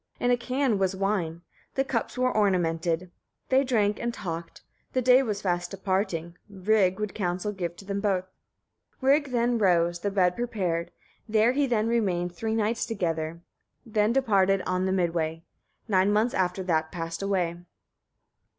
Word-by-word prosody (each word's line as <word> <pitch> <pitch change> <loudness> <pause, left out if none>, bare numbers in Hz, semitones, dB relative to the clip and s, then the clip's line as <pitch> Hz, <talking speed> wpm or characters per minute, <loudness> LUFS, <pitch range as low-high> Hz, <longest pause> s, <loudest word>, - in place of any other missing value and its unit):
In 245 - +2
a - - +5
can 250 -2 0
was 190 0 +1
wine; 185 -4 -1 0.3
the 270 - +2
cups 260 -2 -3
were 255 0 +1
ornamented. 175 -3 +1 0.4
They 265 +1 +4
drank 210 -6 +1
and 235 - -1
talked; 170 -6 -6 0.3
the 255 - +2
day 255 +2 +6
was 210 -6 -3
fast 175 -2 0
departing, 185 -3 -2
Rig 195 -1 +2
would 210 -2 -3
counsel 185 +1 -2
give 175 -4 -4
to 195 - -13
them 200 0 -2
both. 195 -3 +1 0.8
30. 265 +1 +5
Rig 290 -1 +1
then 240 -1 +1
rose, 175 -3 +3
the 205 - -1
bed 180 -3 +2
prepared; 185 -8 -2 0.4
there 220 +2 +4
he 280 +1 +1
then 225 -3 +1
remained 185 -7 0
three 220 +5 -2
nights 225 +1 0
together, 165 -6 -2 0.4
then 215 -1 +1
departed 195 -7 +3
on 185 +1 0
the - - 0
mid 175 -3 +1
way. 165 -1 -2 0.4
Nine 195 -1 +3
months 215 +4 +2
after 185 0 0
that 160 -3 0
passed 165 0 -5
away. 185 -4 0
195 Hz, 165 wpm, -27 LUFS, 175-225 Hz, 0.8 s, day